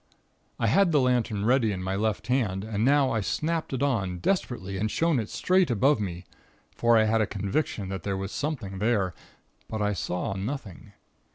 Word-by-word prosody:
I - - -1
had 195 -3 +4
the 150 - +4
lantern 120 -5 +1
ready 120 -2 +3
in 95 -2 -4
my 95 +1 -2
left 110 +1 -1
hand, 110 -6 0
and 110 -1 -2
now 140 +1 +4
I 115 - 0
snapped 160 +10 -2
it 135 0 -1
on, 100 -10 0
desperately, 100 - -1
and 110 +2 0
shone 165 +2 +1
it 110 - -4
straight 185 -2 +2
above 125 +3 +3
me, 90 -3 -4 0.5
for 115 -1 +4
I 110 - +5
had 110 +1 +2
a 105 - +1
conviction 100 0 -2
that 95 -2 -4
there 100 +1 -2
was 95 +1 -4
something 120 -11 -3
there. 105 -4 +1 0.5
But 110 -1 -3
I 105 0 +1
saw 90 0 -2
nothing. 100 -1 -6
110 Hz, 190 wpm, -27 LUFS, 95-130 Hz, 0.5 s, I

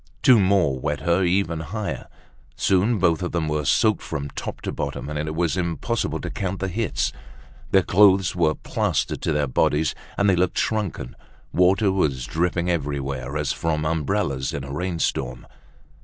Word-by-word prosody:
Two 125 -3 +7
more 95 -9 +2
wet 70 +2 -2
her 85 +4 +2
even 90 -2 +1
higher. 100 +7 -4 0.5
Soon 100 +5 +2
both 85 -4 +2
of 90 - -3
them 85 -3 0
were 75 -1 -1
soaked 110 +6 +3
from 70 -3 -5
top - - -6
to - - -3
bottom - - -4
and 75 - -3
it 75 +1 -3
was 85 0 +1
impossible 90 +6 -1
to - - -5
count 95 0 -3
the 95 - -2
hits. 110 +4 -1 0.6
Their 95 -1 +4
clothes 95 -1 +4
were 80 -3 +2
plastered - - -1
to - - 0
their 75 -1 +1
bodies 75 +3 +1 0.2
and 100 - +2
they 95 - +4
looked 90 0 0
shrunken. 100 - -2 0.4
Water 95 +3 +4
was 70 -10 0
dripping 85 +4 0
everywhere 70 -4 -2
as 75 -2 0
from 80 -2 -1
umbrellas 70 -4 -1
in 70 - -4
a 70 +1 -7
rainstorm. 70 -7 -2
85 Hz, 170 wpm, -23 LUFS, 75-95 Hz, 0.6 s, Two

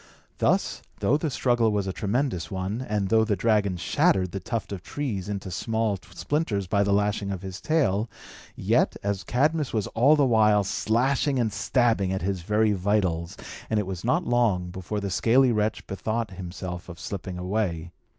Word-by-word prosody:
Thus, - - +1 0.2
though 135 - +3
the 155 +1 0
struggle 120 -4 +2
was 100 -2 0
a 95 - -3
tremendous 100 - -1
one, 95 +5 -3
and 105 -2 0
though 110 0 +4
the 110 -2 +1
dragon 100 -2 +1
shattered 90 +1 +2
the 100 - -4
tuft 110 +3 -4
of 95 -3 -5
trees 105 -6 -4
into 95 -2 -4
small 110 +2 0 0.2
splinters 130 -10 -1
by 100 +2 +1
the 100 0 +1
lashing 100 0 +1
of 95 -1 -4
his 95 -1 -7
tail, 115 -9 +1 0.5
yet, - - +2
as 100 -1 -1
Cadmus 150 +3 +1
was 105 -3 +1
all 135 +7 +4
the 145 -2 +3
while 110 -4 +4
slashing 130 +8 +1
and 115 -4 0
stabbing 110 -3 +1
at 95 -1 -2
his 95 -1 -1
very 105 +4 +2
vitals, 95 -4 0 0.3
it 105 -2 +1
was 95 -2 -5
not 170 +9 +1
long 105 -8 +1
before 95 +3 -4
the 100 -1 -3
scaly 125 +6 +4
wretch 105 -1 0
bethought 110 +2 -3
himself 90 -1 -7
of 85 -2 -9
slipping 95 -1 -5
away. 90 -3 -2
105 Hz, 175 wpm, -26 LUFS, 95-115 Hz, 0.5 s, though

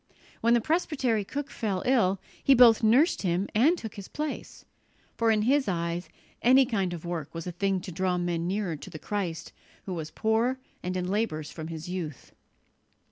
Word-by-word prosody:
When 235 +1 +4
the 235 - +3
presbytery 265 - 0
cook 285 +7 -5
fell 200 -5 -2
ill, 210 -7 +3 0.2
he 275 - +6
both 235 -3 +7
nursed 245 +10 +4
him 180 +1 0
and 290 +12 +4
took 220 -8 -7
his 200 -2 -9
place; 300 0 -5 0.5
for 230 -1 +2
in 215 -1 +3
his 270 +4 +3
eyes 170 -2 -2 0.3
any 260 +2 +6
kind 195 -7 -1
of 175 -1 -6
work 165 -3 -4
was 165 - -5
a 180 - -3
thing 195 +2 0
to 180 - -7
draw 180 +1 0
men 175 -1 -1
nearer 190 -3 -1
to 145 - -10
the - - -8
Christ 180 -2 -4 0.3
who 190 - -4
was 160 -3 -4
"poor 225 +7 +1 0.2
and 185 +1 -3
in 180 0 -2
labours 185 -7 -1
from 160 -1 -7
His 160 0 -7
youth." 170 -7 -5
195 Hz, 190 wpm, -28 LUFS, 175-235 Hz, 0.5 s, both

